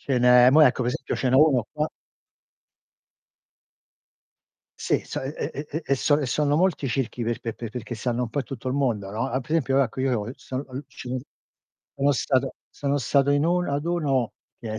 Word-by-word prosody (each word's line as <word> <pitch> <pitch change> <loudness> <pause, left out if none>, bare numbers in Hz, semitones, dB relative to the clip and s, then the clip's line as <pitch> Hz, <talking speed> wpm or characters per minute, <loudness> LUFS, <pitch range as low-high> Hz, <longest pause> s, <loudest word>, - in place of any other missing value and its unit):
Ce 140 - -4
n'è 125 0 +7
mò 155 +4 +6
ecco 130 -3 +4
pe 120 - 0
esempio 135 - -3
ce 130 - 0
n'è 125 - +2
uno 135 -6 +4
qua 150 0 -1 2.9
Sì, - - +1
so - - -5
e 135 +2 -4 0.2
e 145 +2 -5
e 160 +3 -3
e 140 - +3
son 145 +2 +2
e - - -1
sono 145 +3 +1
molti 170 -5 +1
circhi 125 -1 -2
per 115 0 -1
pe 115 -2 -5
pe 115 - -6
perché 120 +1 -6
stanno 120 +1 -2
un 125 - -2
po' 145 - -4
in - - -5
tutto 130 -2 -8
il 130 - 0
mondo, 120 -8 0
no. 115 +6 -2
Altro 130 +2 -4
esempio, 135 -4 +2
ecco, 130 -1 -1
io 120 -5 0
son 130 +2 -6
al 130 +3 -7
ci - - -10 0.9
sono 140 +1 +3
stato 130 0 0 0.2
sono 140 0 -1
stato 140 +2 +2
in 145 +1 +3
uno 175 -2 +1
ad 145 +1 -1
uno 140 -9 0 0.3
che 110 -2 -6
è - - -3
135 Hz, 205 wpm, -25 LUFS, 125-145 Hz, 2.9 s, n'è